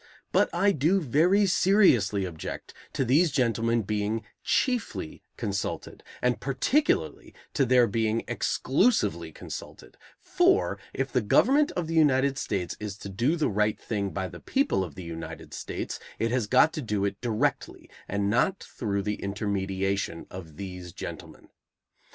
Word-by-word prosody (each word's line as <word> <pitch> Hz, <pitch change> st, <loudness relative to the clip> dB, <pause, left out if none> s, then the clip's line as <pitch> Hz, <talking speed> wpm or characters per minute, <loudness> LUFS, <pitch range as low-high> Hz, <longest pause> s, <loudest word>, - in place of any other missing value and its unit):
But -, -, +3 dB
I 195 Hz, +4 st, +3 dB
do 170 Hz, +4 st, +2 dB
very 175 Hz, -, +3 dB
seriously 155 Hz, -, +4 dB
object 80 Hz, -4 st, -7 dB, 0.2 s
to 135 Hz, -, 0 dB
these 155 Hz, +8 st, +4 dB
gentlemen 115 Hz, -4 st, +1 dB
being 105 Hz, +2 st, -1 dB, 0.2 s
chiefly 245 Hz, -, -1 dB, 0.2 s
consulted, 100 Hz, -1 st, -4 dB, 0.2 s
and 125 Hz, 0 st, +2 dB
particularly 195 Hz, -, 0 dB, 0.2 s
to 135 Hz, -3 st, +2 dB
their 125 Hz, 0 st, +5 dB
being 110 Hz, +1 st, 0 dB
exclusively 225 Hz, -, +1 dB
consulted, -, -, -9 dB, 0.2 s
for, 365 Hz, +1 st, +2 dB
if -, -, -3 dB
the -, -, +2 dB
government 290 Hz, +3 st, +4 dB
of 175 Hz, -, -2 dB
the 165 Hz, -, -4 dB
United 140 Hz, -3 st, +3 dB
States 90 Hz, -4 st, -2 dB
is 105 Hz, -2 st, -5 dB
to 100 Hz, -, -8 dB
do 120 Hz, -, +1 dB
the 155 Hz, -, +1 dB
right 105 Hz, 0 st, +1 dB
thing 100 Hz, -3 st, -2 dB
by 95 Hz, -1 st, -3 dB
the -, -, -10 dB
people 275 Hz, -, +1 dB
of 85 Hz, -5 st, -8 dB
the 95 Hz, -, -7 dB
United 80 Hz, -1 st, -8 dB
States, -, -, -5 dB, 0.2 s
it 115 Hz, 0 st, 0 dB
has 125 Hz, -4 st, 0 dB
got 130 Hz, +7 st, +5 dB
to 155 Hz, -, -3 dB
do 105 Hz, -5 st, -1 dB
it 100 Hz, 0 st, -3 dB
directly 115 Hz, -3 st, -1 dB, 0.2 s
and 100 Hz, 0 st, -1 dB
not 125 Hz, -, +2 dB, 0.2 s
through 100 Hz, -5 st, -1 dB
the 105 Hz, +1 st, -3 dB
intermediation 100 Hz, -3 st, -2 dB
of 80 Hz, -5 st, -9 dB
these 90 Hz, -3 st, -7 dB
gentlemen. -, -, -9 dB
115 Hz, 150 wpm, -27 LUFS, 100-155 Hz, 0.2 s, their